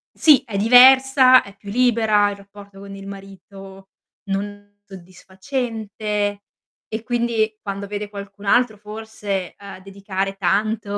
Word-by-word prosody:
Sì, 295 Hz, -5 st, +5 dB
è 220 Hz, -6 st, -6 dB
diversa, 255 Hz, +3 st, +6 dB
è 200 Hz, 0 st, -14 dB
più 200 Hz, 0 st, -13 dB
libera, 220 Hz, -3 st, +2 dB
il 200 Hz, -, -8 dB
rapporto 200 Hz, 0 st, -15 dB
con 200 Hz, 0 st, -10 dB
il 195 Hz, 0 st, -11 dB
marito 195 Hz, 0 st, -12 dB, 0.3 s
non 205 Hz, 0 st, -6 dB
soddisfacente. 205 Hz, +2 st, -5 dB, 0.5 s
E 220 Hz, +1 st, -6 dB
quindi, 235 Hz, -2 st, -1 dB
quando 200 Hz, -1 st, -6 dB
vede 205 Hz, 0 st, -6 dB
qualcun 200 Hz, 0 st, -10 dB
altro 240 Hz, 0 st, +2 dB
forse, 210 Hz, -3 st, -6 dB
uhm, 200 Hz, -1 st, -11 dB
dedicare 195 Hz, 0 st, -5 dB
tanto 205 Hz, +2 st, -1 dB
205 Hz, 125 wpm, -20 LUFS, 195-220 Hz, 0.5 s, diversa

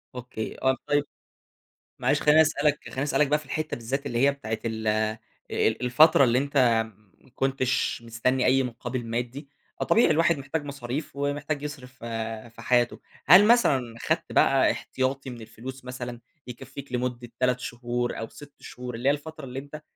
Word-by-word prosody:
أوكي، 125 Hz, -3 st, -6 dB
آه، 130 Hz, 0 st, +3 dB
طيب 145 Hz, 0 st, +2 dB, 1.0 s
معلش -, -, +2 dB
خليني 150 Hz, +1 st, +6 dB
أسألك 150 Hz, -1 st, +2 dB
خليني 130 Hz, -, -3 dB
أسألك 145 Hz, 0 st, +2 dB
بقى 150 Hz, +1 st, +2 dB
في 150 Hz, -, -14 dB
الحتة 155 Hz, 0 st, -3 dB
بالذات 130 Hz, +5 st, -3 dB
اللي 120 Hz, -4 st, -2 dB
هي -, -, +4 dB
بتاعة 110 Hz, -6 st, -4 dB
ال 110 Hz, -1 st, -3 dB
آآ، 110 Hz, +1 st, +1 dB, 0.3 s
الفترة 135 Hz, +8 st, +4 dB
اللي 120 Hz, -1 st, +4 dB
أنت 140 Hz, +2 st, -1 dB, 0.6 s
ما -, -, -22 dB
كنتش 135 Hz, -2 st, 0 dB
مستني 120 Hz, +3 st, 0 dB
أي 135 Hz, +1 st, +4 dB
مقابل 125 Hz, 0 st, -4 dB
مادي، 120 Hz, +5 st, -4 dB, 0.3 s
فطبيعي 225 Hz, -7 st, +4 dB
الواحد 165 Hz, +1 st, +3 dB
محتاج 140 Hz, +3 st, -3 dB
مصاريف، 140 Hz, +1 st, -5 dB
ومحتاج 145 Hz, +1 st, -2 dB
يصرف 135 Hz, -4 st, -7 dB
ف 130 Hz, -, -19 dB, 0.5 s
في -, -, -10 dB
حياته، 120 Hz, -1 st, +2 dB, 0.3 s
هل 180 Hz, +7 st, +9 dB
مثلًا 135 Hz, -, +3 dB
خدت -, -, -1 dB
بقى -, -, +4 dB
إحتياطي 130 Hz, +1 st, -2 dB
من 120 Hz, -2 st, -8 dB
الفلوس 125 Hz, +4 st, -9 dB
مثلًا، 125 Hz, -1 st, -6 dB, 0.3 s
يكفّيك 135 Hz, +2 st, -9 dB
لمدة 125 Hz, -1 st, -2 dB
3 125 Hz, 0 st, +2 dB
شهور 120 Hz, 0 st, -3 dB
أو 115 Hz, -, -5 dB
6 145 Hz, -1 st, -13 dB
شهور 125 Hz, -1 st, -7 dB
اللي 120 Hz, +4 st, +1 dB
هي -, -, +6 dB
الفترة 155 Hz, +1 st, -7 dB
اللي 130 Hz, 0 st, -5 dB
أنت 145 Hz, +2 st, -9 dB
130 Hz, 165 wpm, -26 LUFS, 120-145 Hz, 1.0 s, هل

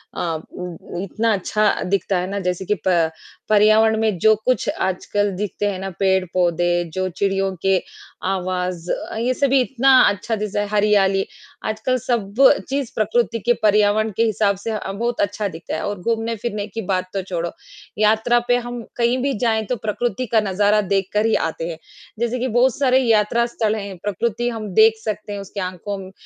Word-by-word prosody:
अ -, -, -3 dB, 0.3 s
उम, 180 Hz, 0 st, -7 dB
इतना 220 Hz, +4 st, 0 dB
अच्छा 210 Hz, +2 st, +1 dB, 0.2 s
दिखता 195 Hz, -1 st, +1 dB
है 180 Hz, -, -2 dB
ना, 200 Hz, 0 st, -2 dB
जैसे 180 Hz, 0 st, -2 dB
कि 210 Hz, -, +1 dB
प 170 Hz, -3 st, +3 dB, 0.4 s
पर्यावरण 215 Hz, +1 st, +5 dB
में 215 Hz, -4 st, +1 dB
जो 220 Hz, +3 st, +6 dB
कुछ 255 Hz, 0 st, +1 dB
आजकल 200 Hz, +2 st, 0 dB
दिखते 205 Hz, +1 st, -3 dB
हैं 185 Hz, -, -5 dB
ना, 195 Hz, 0 st, -4 dB
पेड़-पौधे, 175 Hz, -2 st, +1 dB
जो 185 Hz, 0 st, -1 dB
चिड़ियों 195 Hz, +1 st, 0 dB
के 195 Hz, -1 st, +4 dB, 0.5 s
आवाज़ 180 Hz, -2 st, -2 dB
अ, -, -, -4 dB
ये 245 Hz, +3 st, +1 dB
सभी 275 Hz, 0 st, +3 dB
इतना 265 Hz, +1 st, +4 dB
अच्छा 205 Hz, +3 st, -2 dB
चीज़ 210 Hz, -1 st, -4 dB
है, 205 Hz, -, +1 dB
हरियाली। 205 Hz, -2 st, +2 dB, 0.4 s
आजकल 220 Hz, +4 st, 0 dB
सब 220 Hz, -5 st, -2 dB, 0.4 s
चीज़ 275 Hz, -3 st, -2 dB
प्रकृति 230 Hz, +2 st, +1 dB
के 240 Hz, +4 st, +2 dB
पर्यावरण 210 Hz, +1 st, +3 dB
के 230 Hz, -, +4 dB
हिसाब 210 Hz, -2 st, +1 dB
से 225 Hz, +3 st, -4 dB
अ, 205 Hz, -2 st, -4 dB
बहुत 235 Hz, +4 st, -2 dB
अच्छा 205 Hz, +1 st, -1 dB
दिखता 165 Hz, -3 st, -6 dB
है -, -, -3 dB
और 205 Hz, -2 st, -3 dB
घूमने-फिरने 225 Hz, -1 st, -2 dB
की 225 Hz, +2 st, -5 dB
बात 185 Hz, 0 st, -1 dB
तो 195 Hz, -, -1 dB
छोड़ो, 175 Hz, -2 st, -3 dB, 0.5 s
यात्रा 220 Hz, +3 st, +3 dB
पे 245 Hz, 0 st, +4 dB
हम 240 Hz, 0 st, -5 dB, 0.2 s
कहीं 235 Hz, +1 st, +2 dB
भी 275 Hz, 0 st, 0 dB
जाएँ, 220 Hz, -3 st, +1 dB
तो 250 Hz, -, -1 dB
प्रकृति 235 Hz, +2 st, -2 dB
का 225 Hz, -, +5 dB
नज़ारा 205 Hz, +2 st, +3 dB
देखकर 200 Hz, +2 st, 0 dB
ही 225 Hz, -, +3 dB
आते 165 Hz, +1 st, -5 dB
हैं। 160 Hz, -, -6 dB, 0.4 s
जैसे 235 Hz, +1 st, -1 dB
कि 255 Hz, -, -1 dB
बहुत 245 Hz, +1 st, +2 dB
सारे 260 Hz, -2 st, +3 dB
यात्रा 230 Hz, -1 st, +2 dB
स्थल 220 Hz, -2 st, -1 dB
हैं, 200 Hz, -3 st, -6 dB
प्रकृति 230 Hz, +4 st, -1 dB
हम 225 Hz, -3 st, -5 dB
देख 220 Hz, +1 st, +5 dB
सकते 210 Hz, -1 st, -4 dB
हैं, 200 Hz, -, -4 dB
उसकी 200 Hz, +1 st, -7 dB
आँखों 185 Hz, +2 st, -4 dB
म -, -, -13 dB
210 Hz, 185 wpm, -21 LUFS, 190-230 Hz, 0.5 s, जो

